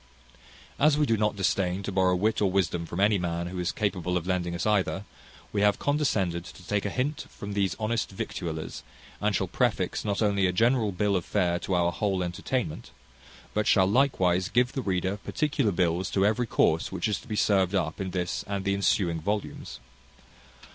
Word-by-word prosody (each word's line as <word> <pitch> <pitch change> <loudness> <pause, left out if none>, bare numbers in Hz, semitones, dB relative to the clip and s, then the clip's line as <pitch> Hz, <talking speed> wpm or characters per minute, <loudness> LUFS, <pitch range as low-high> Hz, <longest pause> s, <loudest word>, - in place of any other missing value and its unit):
As 150 +1 +4
we 150 - +3
do 115 - +2
not 105 0 0
disdain 95 -1 0
to 100 - -3
borrow 95 -1 +3
wit 105 +5 +1
or 100 - +3
wisdom 90 -3 0
from 85 - -5
any 105 0 +4
man 85 -1 -2
who 90 +1 -5
is 90 - 0
capable 90 -3 -1
of 85 - -4
lending 90 -2 -1
us 85 - -3
either, 100 -1 +1 0.5
we 100 - +1
have 105 0 +4
condescended 100 - 0
to 90 0 -13
take 105 -1 0
a - - 0
hint 135 +7 -2
from 100 0 -7
these 100 -3 0
honest 115 +1 -1
victuallers, 85 -4 -5 0.4
and - - +1
shall - - +1
prefix - - 0
not 105 -1 -1
only 100 -2 +2
a - - +1
general 115 +2 +2
bill 100 +2 0
of 90 - 0
fare 90 -3 0
to 95 - -2
our 85 -1 +2
whole 95 0 -1
entertainment, 90 +1 -3 0.6
but 105 0 0
shall 95 -4 +5
likewise 95 -6 +2
give 125 +3 +2
the 135 - -2
reader 95 -2 -1
particular 140 0 0
bills 90 +1 0
to 95 0 +2
every 115 +3 +1
course 80 -5 +2
which 95 0 -1
is 105 - -1
to - - -16
be 110 - -3
served 100 -2 +2
up 85 -1 -1
in 95 - -2
this 90 -1 -2
and 100 -1 -3
the 100 - +2
ensuing 90 -4 +1
volumes. 105 +5 -4
95 Hz, 195 wpm, -27 LUFS, 90-105 Hz, 0.6 s, shall